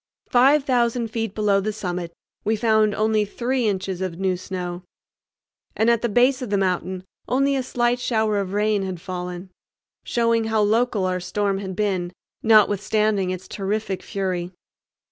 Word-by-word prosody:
Five 270 +3 +5
thousand 240 -3 +1
feet 225 -3 -3
below 205 -2 +2
the 210 +2 -1
summit 180 -4 -4 0.3
we 220 +1 +1
found 215 -1 +2
only 215 0 +2
three 240 +3 -1
inches 190 -2 -2
of 185 -3 -3
new 190 -1 0
snow, 180 -1 -5 1.0
and 225 +2 +4
at 235 -1 +2
the 235 - 0
base 250 +5 +3
of 250 - -4
the 200 - +1
mountain 185 -1 -1 0.2
only 275 +2 +2
a 265 - +1
slight 245 -1 0
shower 220 -4 +1
of 190 -2 -3
rain 210 0 +1
had 185 -2 -4
fallen, 180 0 -6 0.5
showing 230 -1 +1
how 220 -1 +1
local 220 -1 +2
our 185 0 0
storm 200 +2 -1
had 190 -2 -5
been, 190 -4 -1 0.3
notwithstanding 210 -2 +3
its 185 0 -5
terrific 200 -1 -3
fury. 185 -3 -3
210 Hz, 160 wpm, -23 LUFS, 185-230 Hz, 1.0 s, Five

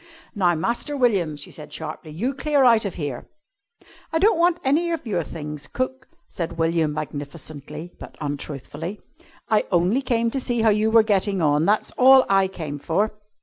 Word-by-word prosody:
"Now, 180 -5 +2
Master 235 - -2
William," 195 - +2
she 145 - -11
said 150 - -11
sharply, 155 0 -7
"you 215 - -2
clear 285 0 +1
out 230 -3 +5
of 200 - -4
here!" 145 -6 -5 0.8
"I 325 - +1
don't 385 +1 +3
want 345 0 +4
any 310 +6 +2
of 330 -5 -3
your 195 -6 0
things, 150 -2 -7
cook," 260 0 -4 0.2
said 165 -1 -5
William, 165 -1 +1
magnificently 150 +2 -7
but - - -10
untruthfully. 145 +5 -5 0.5
"I 215 -1 +2
only 180 +8 +2
came 235 -3 0
to 270 - -1
see 240 -3 -1
how 225 - +5
you 215 +1 +2
were 225 0 +6
getting 200 -2 +1
on. 150 -1 +2
That's 210 +3 +1
all 265 +1 +8
I 195 -1 +4
came 155 -6 -6
for." 200 +9 0
195 Hz, 175 wpm, -23 LUFS, 155-245 Hz, 0.8 s, all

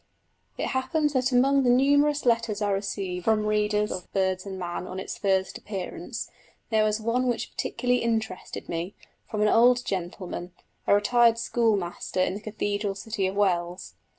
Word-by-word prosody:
It - - -2
happened 290 +4 0
that 255 -2 +1
among 270 +3 +4
the 250 - +2
numerous 285 +3 +3
letters 230 -3 +2
I 205 -1 0
received 195 -2 -3
from 220 -1 +2
readers 210 0 +1
of 180 - -6
Birds 190 0 0
and 190 -1 -5
Man 180 0 -4
on 185 - -5
its - - -5
first 190 -2 0
appearance 195 -3 -5 0.4
there 220 -1 +4
was 215 0 +1
one 235 +3 0
which 240 - -2
particularly 250 -1 0
interested 220 -5 -3
me, 170 +4 -4 0.3
from 210 -2 0
an - - +4
old 245 +3 +5
gentleman, 180 -2 -4 0.3
a - - +6
retired 230 +2 +4
schoolmaster 210 -7 0
in 185 0 +2
the 205 - -6
cathedral 205 -2 -2
city 200 -1 -2
of 190 - -4
Wells. 180 -3 0
210 Hz, 165 wpm, -26 LUFS, 190-240 Hz, 0.4 s, a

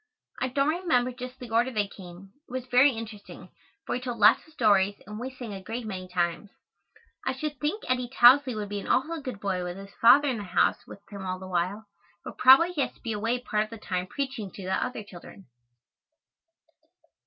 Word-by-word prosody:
I 255 - +1
don't 275 +3 +1
remember 255 -8 +1
just 250 +1 -8
the 245 -3 -10
order 235 +3 +2
they 210 -5 -1
came. 190 0 -13 0.2
It - - -15
was 255 0 -4
very 255 +3 +5
interesting, 225 -3 -9 0.4
for - - -3
he 250 - -2
told 245 -2 -4
lots 215 +6 +5
of - - -19
stories 205 -5 +2
and 210 +2 -8
we 250 +2 -4
sang 250 -5 -8
a 195 - -7
great 225 +5 -6
many 185 -3 -6
times. 175 +1 -2 0.7
I - - -1
should 295 +1 -5
think 310 +9 -2
Eddy 250 -1 0
Tousley 260 0 +6
would 210 -1 -4
be 205 0 -3
an - - -8
awful 315 +5 0
good 255 -7 -6
boy 190 -3 -2
with 180 +1 -5
his 195 0 -11
father 285 +5 +7
in 255 -4 0
the - - -5
house 180 -2 +1
with 200 - -11
him 200 -1 -7
all 185 0 -3
the 185 0 -9
while, 185 +4 -2 0.4
but - - -9
probably 270 +7 +7
he 315 -5 -1
has - - -1
to - - -25
be 230 - -4
away 230 +4 -1
part 215 -3 0
of - - -16
the 230 - -9
time 185 -3 -3
preaching 265 -4 -4
to 195 - -9
other 215 +4 -2
children. 195 0 -13
225 Hz, 215 wpm, -27 LUFS, 195-255 Hz, 0.7 s, father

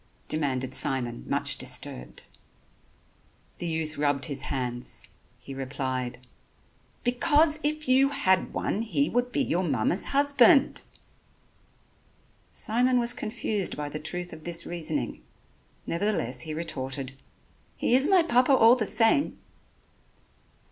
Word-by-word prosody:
demanded 130 -4 -2
Simon, 120 - +1
much - - -1
disturbed. 60 - -1 1.4
The 175 - -3
youth 160 -2 -3
rubbed 145 -2 0
his 140 -3 -2
hands. 125 -2 -3 0.3
He 130 +2 -10
replied: 130 -2 -4 0.8
"Because 300 +5 +3
if 305 0 -2
you 265 +2 +4
had 190 -10 +1
one 205 - -2
he 255 +5 0
would 245 +1 0
be 275 - +1
your 180 -6 0
mamma's 145 - 0
husband." 285 +1 +4 1.7
Simon 250 +3 +1
was 235 0 0
confused 215 -3 -3
by 145 -1 -4
the 155 - -6
truth 175 +3 -3
of 155 - -11
this 170 0 0
reasoning, 175 - -3 0.6
nevertheless 170 - -1
he 155 +4 -5
retorted: 135 -4 -4 0.6
"He - - 0
is 265 +3 +4
my 375 -2 +5
Papa 255 -3 +3
all 230 -1 +6
the 220 -5 -1
same." 235 +5 +2
175 Hz, 120 wpm, -27 LUFS, -, 1.7 s, all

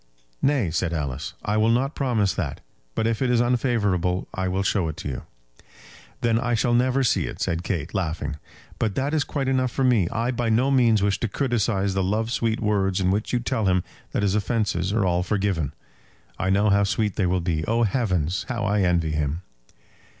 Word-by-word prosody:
"Nay," 135 - +2
said 85 +1 -1
Alice; 70 -3 -3
"I 105 +1 +1
will 110 +1 +3
not 130 +5 +1
promise 115 -8 +1
that. 85 -8 -4 0.3
But 110 - 0
if 115 +1 0
it 130 - +2
is 120 -1 +3
unfavourable 105 -8 +1
I 95 0 -2
will 95 +1 0
show 95 -3 +1
it 80 - -6
you." 70 -3 -4 1.0
"Then 115 -1 +2
I 120 -1 0
shall 120 +2 +1
never 130 +2 +2
see 115 - +2
it," - - -7
said 85 0 -1
Kate, 85 -2 -3
laughing. 80 -5 -2 0.4
"But 110 -3 0
that 140 +3 -1
is 155 -2 +2
quite 140 -3 -3
enough 130 -1 +2
for 135 - -2
me. 115 -9 +3
I 115 +3 -1
by 120 -2 -1
no 125 +5 +3
means 115 -6 +4
wish 100 -1 +1
to 115 - 0
criticise 105 -5 0
the 95 - 0
love 110 +4 0
sweet 115 -2 0
words 100 -3 +1
in 95 -1 +2
which 105 +3 -1
you 125 - +2
tell 120 -4 -1
him 90 -1 +2 0.3
that - - -1
his 100 -2 +2
offences 100 -3 0
are 105 -2 +1
all 90 -1 +2
forgiven. 95 -6 -1 0.7
I 95 - 0
know 100 +2 +3
how 100 0 +4
sweet 105 +1 0
they 95 - +1
will 90 +1 +1
be. 85 -3 -1
Oh, 115 +1 +2
heavens! 95 - 0
how 115 -5 -2
I 100 0 +2
envy 85 -4 +2
him!" 75 +3 -2
105 Hz, 205 wpm, -24 LUFS, 90-120 Hz, 1.0 s, means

